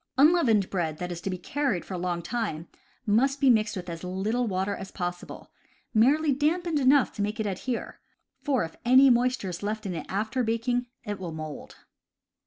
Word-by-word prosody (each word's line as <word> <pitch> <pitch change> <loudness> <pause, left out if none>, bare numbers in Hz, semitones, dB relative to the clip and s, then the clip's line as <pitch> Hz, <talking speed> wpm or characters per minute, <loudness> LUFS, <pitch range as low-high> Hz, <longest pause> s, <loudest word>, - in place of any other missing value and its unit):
Unleavened 270 - +4
bread 165 -5 -1
that 180 +1 -4
is 170 -1 -6
to 195 - -3
be 185 - -3
carried 260 0 -2
for - - -7
a - - -2
long 175 -1 -2
time 170 -7 -3 0.4
must 265 +7 +2
be 270 -3 +5
mixed 215 -2 +2
with 180 -1 -6
as 165 0 -6
little 205 +7 -1
water 190 0 -1
as 190 0 -8
possible 175 -1 -6 0.4
(merely 280 +7 +4
dampened 315 +3 0
enough 270 0 +4
to 210 - -4
make 210 +2 -2
it 220 - 0
adhere), 210 +5 -4 0.4
for 275 -4 +1
if 165 - -7
any 260 +2 +7
moisture 245 -4 +1
is 175 - -6
left 215 +1 -3
in 190 - -3
it 160 -3 -6
after 220 +6 -1
baking, 245 +2 0 0.2
it 205 -1 -5
will 180 -3 -5
mold. 155 -1 -7
215 Hz, 195 wpm, -27 LUFS, 180-255 Hz, 0.4 s, any